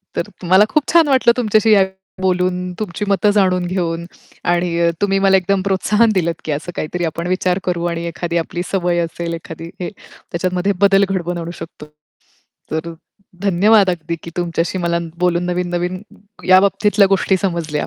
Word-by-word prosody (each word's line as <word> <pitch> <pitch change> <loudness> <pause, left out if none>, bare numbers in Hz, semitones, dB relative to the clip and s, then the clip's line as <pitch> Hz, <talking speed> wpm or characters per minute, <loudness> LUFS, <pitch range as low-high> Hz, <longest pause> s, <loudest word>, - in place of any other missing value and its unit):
तर - - -2 0.2
मला 190 +3 +6
खूप 305 - +2
छान 335 -2 +6
वाटलं 260 -4 +4
तुमच्याशी 220 -2 +3
या 200 - +6
विषयावर 190 0 -2 0.2
बोलून, 180 -1 0
तुमची 210 -1 -3
मतं 200 +1 +2
जाणून 185 -3 +2
घेऊन 170 -2 -2 0.4
आणि 175 -1 +1
अ, 170 0 +3
तुम्ही 195 -1 +2
मला 195 0 +4
एकदम 190 +1 0
प्रोत्साहन 210 +4 +2
दिलंत 170 -4 -1
की 155 - -2
असं 150 +4 -4
काहीतरी 175 +3 -3
आपण 165 +2 -3
विचार 185 0 0
करू 175 -1 -2
आणि 170 0 -4
एखादी 170 +1 -3
आपली 170 +1 -3
सवय 175 -2 +1
असेल, 170 0 -3
एखादी 165 0 -8
हे 175 - -2
त्याच्यामध्ये 185 +3 -3
बदल 200 0 +5
घडवून 175 -2 -2
आणू 170 0 -5
शकतो. 165 -2 -9 0.9
तर 160 +2 -3 0.5
धन्यवाद 200 +1 +4
अगदी 170 -1 -4
की 170 - -8
तुमच्याशी 175 +1 -1
मला 170 -1 0 0.2
बोलून 175 -1 +1
नवीन-नवीन 180 0 -2 0.5
या 185 0 +8
बाबतीतल्या 200 +1 +3
गोष्टी 195 0 +2
समजल्या. 170 -5 -2
180 Hz, 170 wpm, -18 LUFS, 170-195 Hz, 0.9 s, या